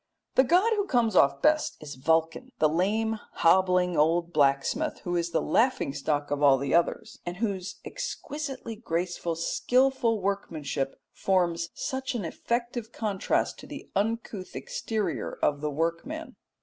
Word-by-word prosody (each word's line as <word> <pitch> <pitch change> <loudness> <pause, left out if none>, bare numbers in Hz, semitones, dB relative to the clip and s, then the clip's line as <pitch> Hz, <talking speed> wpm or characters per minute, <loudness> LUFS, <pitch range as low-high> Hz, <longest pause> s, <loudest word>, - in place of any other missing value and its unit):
The 260 - +6
god 365 - +4
who 410 -2 0
comes 230 - +2
off 140 -5 +4
best 305 0 +3
is 150 -1 -8
Vulcan, 160 - 0
the 155 - +4
lame, 215 +7 0
hobbling, 180 0 +3
old 170 +3 +2
blacksmith, 140 -2 +1
who 175 -1 -2
is 170 0 0
the - - 0
laughing 230 - +2
stock 145 0 -1
of 145 0 -1
all 140 -2 +6
the 140 +1 -2
others, 170 0 +1
and 175 0 -5
whose 200 -3 -2
exquisitely 295 - -5
graceful 175 -4 -2
skilful 245 +6 +2
workmanship 155 -8 -2
forms 170 -3 +1
such 265 -1 -3
an 210 -7 -2
effective 235 +5 -3
contrast 205 -5 -1
to - - -11
the - - -9
uncouth 210 -2 -2
exterior 235 - -3
of 145 -1 +2
the 150 - -1
workman. 170 - -3
185 Hz, 145 wpm, -28 LUFS, 165-235 Hz, -, The